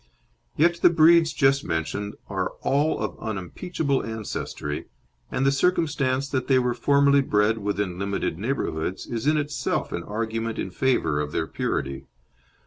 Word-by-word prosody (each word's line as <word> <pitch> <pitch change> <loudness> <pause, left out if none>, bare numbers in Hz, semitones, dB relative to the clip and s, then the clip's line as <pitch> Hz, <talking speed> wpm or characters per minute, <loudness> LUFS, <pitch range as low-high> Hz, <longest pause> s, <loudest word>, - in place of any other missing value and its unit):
Yet 170 +2 +3
the - - +7
breeds 165 0 +5
just 135 -1 +3
mentioned 100 +6 -3
are 95 -2 -2
all 145 +3 +2
of - - -4
unimpeachable 135 - -2
ancestry, 110 -9 -4 0.4
and 135 - -1
the 135 - +5
circumstance 140 -4 +1
that 130 -3 -2
they 135 - +4
were 125 -1 +1
formerly 140 +2 +4
bred 105 -3 +2
within 100 -3 -2
limited 100 -4 -2
neighbourhoods 95 - -2
is 120 +3 -3
in 155 0 +4
itself 150 -1 -2
an - - -3
argument 115 +1 -3
in 95 - -3
favour 85 - +1
of 75 0 -4
their 80 - -1
purity. 70 -3 -3
125 Hz, 145 wpm, -25 LUFS, 100-140 Hz, 0.4 s, the